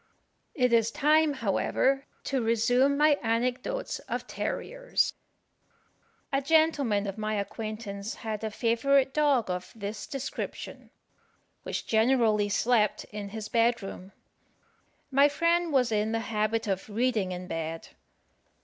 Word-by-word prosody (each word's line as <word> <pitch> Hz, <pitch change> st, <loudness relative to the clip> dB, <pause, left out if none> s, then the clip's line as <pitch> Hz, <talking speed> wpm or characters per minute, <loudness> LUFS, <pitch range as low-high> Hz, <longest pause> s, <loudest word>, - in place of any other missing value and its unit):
It 250 Hz, -4 st, +2 dB
is 230 Hz, -1 st, +4 dB
time, 300 Hz, +3 st, +3 dB
however, 265 Hz, +4 st, 0 dB, 0.2 s
to 270 Hz, -2 st, -1 dB
resume 245 Hz, +5 st, +2 dB
my 295 Hz, -1 st, +4 dB
anecdotes 250 Hz, -, -1 dB
of -, -, -3 dB
terriers. -, -, -2 dB, 1.2 s
A 275 Hz, -, +2 dB
gentleman 280 Hz, -9 st, +2 dB
of 200 Hz, +1 st, -5 dB
my 215 Hz, 0 st, -1 dB
acquaintance 210 Hz, 0 st, -5 dB
had 220 Hz, -1 st, -5 dB
a 220 Hz, -, -1 dB
favourite 260 Hz, +5 st, +2 dB
dog 280 Hz, -9 st, +2 dB
of 180 Hz, 0 st, -5 dB
this 205 Hz, -1 st, -6 dB
description, 275 Hz, -1 st, -6 dB, 0.7 s
which -, -, -4 dB
generally 220 Hz, -2 st, +3 dB
slept 220 Hz, 0 st, +2 dB
in 205 Hz, -1 st, -6 dB
his 215 Hz, 0 st, -6 dB
bed 235 Hz, -1 st, +2 dB
room. 195 Hz, 0 st, -8 dB, 1.0 s
My 280 Hz, +2 st, +5 dB
friend 335 Hz, +2 st, +1 dB
was 255 Hz, -4 st, +2 dB
in 215 Hz, +1 st, 0 dB
the 225 Hz, -, 0 dB
habit 215 Hz, +1 st, 0 dB
of 195 Hz, 0 st, -3 dB
reading 215 Hz, -3 st, 0 dB
in 180 Hz, 0 st, -5 dB
bed. 165 Hz, -2 st, -5 dB
230 Hz, 125 wpm, -28 LUFS, 210-275 Hz, 1.2 s, My